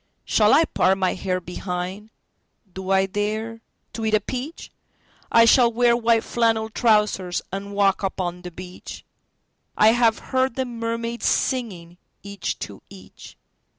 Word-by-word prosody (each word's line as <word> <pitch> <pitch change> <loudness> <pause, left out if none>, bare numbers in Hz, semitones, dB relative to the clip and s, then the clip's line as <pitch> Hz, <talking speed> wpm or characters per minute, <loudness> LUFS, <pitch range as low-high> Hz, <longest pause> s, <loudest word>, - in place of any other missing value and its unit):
Shall 210 -1 +3
I 315 +4 +5
part 190 -8 +1
my 190 -1 +1
hair 185 -1 -2
behind? 180 +3 -5 0.6
Do 190 0 -7
I 190 0 +3
dare 215 +3 -3 0.3
to 225 - -5
eat 220 -1 +2
a - - +3
peach?I 250 - -2
shall 235 0 +5
wear 240 +1 +3
white 230 -1 +2
flannel 225 -2 0
trousers, 210 -6 +1
and 200 +1 -6
walk 200 -1 +2
upon 180 -2 -3
the 180 - -7
beach.I 180 +4 -4
have 230 -1 +3 0.2
heard 260 -2 +1
the 260 - -1
mermaids 230 0 -3
singing, 180 -9 -2 0.2
each 200 -2 -4
to 100 -2 -13
each. 95 -1 -14
210 Hz, 135 wpm, -23 LUFS, 185-230 Hz, 0.6 s, I